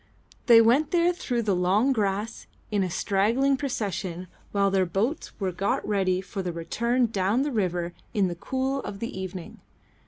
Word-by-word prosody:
They 230 -2 +9
went 265 +7 +3
there 350 0 +3
through 245 -8 -2
the 205 -3 +1
long 195 +9 +2
grass 210 0 -2 0.2
in 205 -2 +1
a 185 - -1
straggling 220 +10 +2
procession 195 - -3 0.2
while 200 -1 +2
their 190 -1 +3
boats 215 - -1
were 190 -2 -1
got 195 +3 -1
ready 190 -3 +1
for 195 +1 -5
the 180 -1 -3
return 235 +9 0
down 210 +3 +1
the 290 - -2
river 175 -6 -1 0.2
in 200 -4 +2
the 175 - -3
cool 265 +9 -2
of 200 - -6
the 230 +4 -5
evening. 190 -2 -7
205 Hz, 175 wpm, -26 LUFS, 185-240 Hz, 0.2 s, They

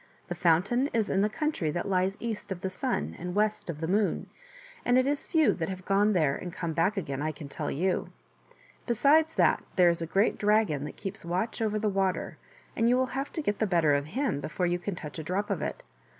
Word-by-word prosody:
The - - -1
fountain 180 - +2
is 225 -3 +1
in 195 - +2
the 210 - +2
country 300 - -1
that 175 +6 -2
lies 190 +1 +1
east 225 -4 -5
of 180 -2 -4
the 190 - -2
Sun 80 - -2
and 180 +1 -5
west 210 -2 0
of 155 -2 -5
the 160 - -1
Moon, 200 +3 0 0.5
and 245 +1 +3
it 255 - +4
is 285 +1 -1
few 315 -2 +4
that 165 -1 -3
have 185 -1 -6
gone 205 +2 +3
there 155 -6 +2
and 180 - -6
come 170 -2 -3
back 180 +7 +1
again, 140 -7 -3
I 155 +1 0
can 150 -1 -9
tell - - -4
you. 180 +6 -1 0.8
Besides 300 +7 +4
that - - +3
there 180 -2 +6
is 170 0 0
a 165 - -2
great 195 +6 +2
dragon 205 -9 +2
that 150 - -8
keeps 195 0 -6
watch 185 +8 -2
over 215 -1 +1
the 215 0 0
water, 195 -2 -1 0.4
and 230 +1 +3
you 250 - +4
will 260 0 0
have 275 +2 -3
to 320 - -3
get 205 -6 -1
the 220 - +2
better 165 -5 +3
of 140 +1 0
him 265 - 0
before 160 +5 -2
you 175 0 0
can 190 +1 -4
touch 155 -1 -7
a - - -4
drop 190 +6 -2
of - - -1
it. - - -4
190 Hz, 235 wpm, -28 LUFS, 170-220 Hz, 0.8 s, there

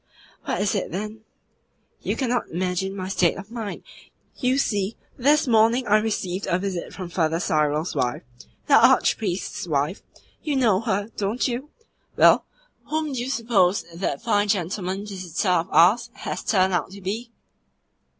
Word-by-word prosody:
"What - - -1
is 205 - +1
it, 200 - -2
then?" 210 +5 -5 0.8
"You - - -2
cannot 245 -2 -1
imagine 185 +2 -2
my 185 -1 -4
state 185 -3 +1
of 195 +3 -10
mind! 225 -4 -5 0.5
You 255 0 +1
see, 205 -5 0 0.2
this 290 +4 +3
morning 230 +2 +4
I 210 -1 +4
received 200 -4 -2
a 175 - +2
visit 185 -2 -4
from 185 -2 -6
Father 165 -2 0
Cyril's 155 0 0
wife 125 -1 -1 0.4
the - - +5
Archpriest's 190 -3 +2
wife 150 +4 -1 0.4
you 300 -2 -2
know 225 -8 +3
her, 205 -2 -1
don't 210 +6 0
you? 255 +4 -4 0.5
Well, - - +6 0.4
whom 310 -2 -2
do 255 - -2
you 245 +2 -3
suppose 215 -7 +2
that 180 +6 -3
fine 210 -3 +2
gentleman 190 0 -2
visitor 185 -2 -3
of 175 -2 +1
ours 200 +9 +4
has - - -5
turned 190 -3 +2
out 175 -1 0
to 200 - -10
be?" 220 +6 -4
200 Hz, 155 wpm, -24 LUFS, 180-230 Hz, 0.8 s, Well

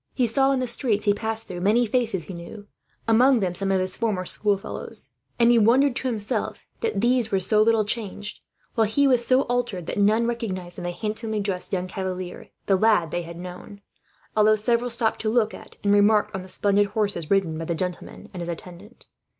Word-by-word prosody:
He 255 - +2
saw 270 +4 +2
in 270 - +1
the 255 - 0
streets 235 -3 0
he 205 - +4
passed 225 +1 -3
through 175 -1 -6
many 220 +6 +3
faces 225 -6 0
he 185 - -9
knew, 175 +5 -9 0.4
among 245 +3 +5
them 185 -4 -1
some 195 +2 -1
of 190 - +2
his 185 0 0
former 210 -6 -1
schoolfellows; 200 +1 -2 0.3
and 235 0 +5
he 235 - +5
wondered 245 +5 +4
to 260 - -2
himself 220 -4 -3
that 450 - -1
these 240 -1 +2
were 195 - +2
so 210 +3 +3
little 220 -1 +3
changed, 210 -1 -5 0.3
while 225 -2 +2
he 280 +7 +2
was 250 -3 +3
so 255 +2 +3
altered 240 -7 -2
that - - -3
none 215 +3 +3
recognized, 190 -7 -4
in - - -6
the - - -1
handsomely 215 +3 -3
dressed 195 -3 -2
young 180 -1 -1
cavalier, 185 -1 -5 0.2
the 195 - +3
lad 200 -6 +3
they 175 - -1
had 170 0 -9
known; 180 +3 -9 0.6
although 215 0 +5
several 235 +3 0
stopped 230 -1 0
to 215 - 0
look 220 -1 +2
at, - - -12
and 200 0 +3
remark 210 +1 +4
on, 190 - -4
the 185 - -11
splendid 200 +2 +2
horses 200 -6 -2
ridden 195 -5 +2
by 165 +1 -4
the 170 - -2
gentleman 180 +1 -5
and 180 - -6
his 170 - -5
attendant. 180 +6 -9
210 Hz, 210 wpm, -24 LUFS, 185-230 Hz, 0.6 s, among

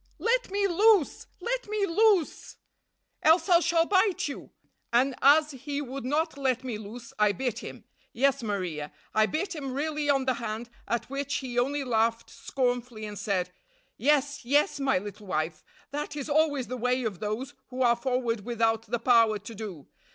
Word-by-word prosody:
Let - - +1
me 400 +1 0
loose! 395 -2 +3
Let - - -2
me 425 -1 +1
loose, 395 -2 +2 0.6
else 320 +3 +4
I 345 -1 +7
shall 335 -1 +2
bite 380 -1 +2
you!' 280 - -7 0.4
And 255 +3 +3
as 300 +2 +6
he 280 +2 -5
would 270 -2 -5
not 300 +2 -1
let 260 -2 0
me 240 -5 -4
loose 225 +3 -10
I 210 -1 +4
bit 245 +3 -2
him. - - -9 0.3
Yes, 275 +2 +2
Maria, 180 -9 -3 0.2
I 215 0 +4
bit 365 - -2
him 275 -4 -5
really 300 0 -1
on 270 -2 +3
the 260 - +2
hand, 230 0 -5 0.2
at 235 -1 -1
which 280 -1 -2
he 250 -3 -2
only 280 +3 0
laughed 230 -2 0
scornfully 245 -4 -2
and 205 -2 -7
said: 190 -3 -1 0.4
'Yes, 290 -1 +1
yes, 285 +3 +2
my 275 -4 +2
little 205 +2 -7
wife, 155 -2 -2 0.3
that 295 +1 -4
is 290 0 -4
always 290 -3 +2
the 255 +1 -5
way 250 +1 0
of 205 -6 -3
those 220 +7 -3
who 255 0 -2
are 240 -1 +5
forward 235 -3 -1
without 225 -1 0
the 240 +3 -1
power 230 -2 +4
to 205 +3 -10
do. 195 -10 -8
255 Hz, 175 wpm, -28 LUFS, 225-295 Hz, 0.6 s, I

